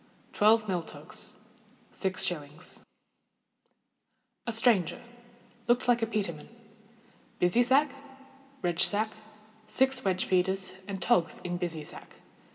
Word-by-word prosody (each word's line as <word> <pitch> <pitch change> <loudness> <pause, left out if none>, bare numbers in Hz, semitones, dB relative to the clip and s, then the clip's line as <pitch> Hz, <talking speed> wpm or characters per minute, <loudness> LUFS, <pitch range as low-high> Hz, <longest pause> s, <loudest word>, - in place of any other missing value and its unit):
_ - - -30
Twelve 215 +1 +4
mill 180 -3 0
togs. - - -6 0.6
6_s._ 175 -4 -2 1.7
A - - +1
Stranger—looked 240 +2 0
like 240 -1 +4
a 225 - +1
peterman. 195 -9 -2 0.9
Busy 180 +7 +3
sack, 270 +3 +4 0.7
redge 175 -1 +3
yack, 215 +1 0 0.6
six 265 +2 +2
wedge 185 -1 +1
feeders, 190 +1 +1
and 195 -1 -4
togs 175 -1 +2
in 175 0 -2
busy 170 -3 -3
sack. - - -11
205 Hz, 105 wpm, -29 LUFS, 180-240 Hz, 1.7 s, Twelve